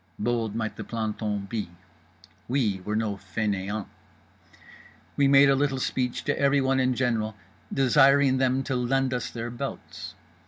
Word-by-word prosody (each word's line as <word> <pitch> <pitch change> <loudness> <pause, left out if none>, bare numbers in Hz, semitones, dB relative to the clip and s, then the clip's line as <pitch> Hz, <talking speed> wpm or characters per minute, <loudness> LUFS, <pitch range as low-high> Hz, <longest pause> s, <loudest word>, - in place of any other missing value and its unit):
Bold 115 -1 -1
might 110 -2 -3
the - - -5
planton 105 -3 -3
be; 105 -2 -4 0.8
we 115 -7 0
were 105 +2 -2
no 110 -2 -1
fainéants. 100 +1 -3 1.3
We 140 - +3
made 140 +1 +7
a 135 - +4
little 135 -1 +1
speech 125 -1 -2
to - - -1
everyone 135 -1 +3
in 130 -1 +2
general 115 -4 0 0.4
desiring 135 0 +4
them 130 0 +2
to 135 - -2
lend 130 +1 +1
us 125 -2 -2
their 115 0 -5
belts. 120 - -7
120 Hz, 145 wpm, -26 LUFS, 110-135 Hz, 1.3 s, made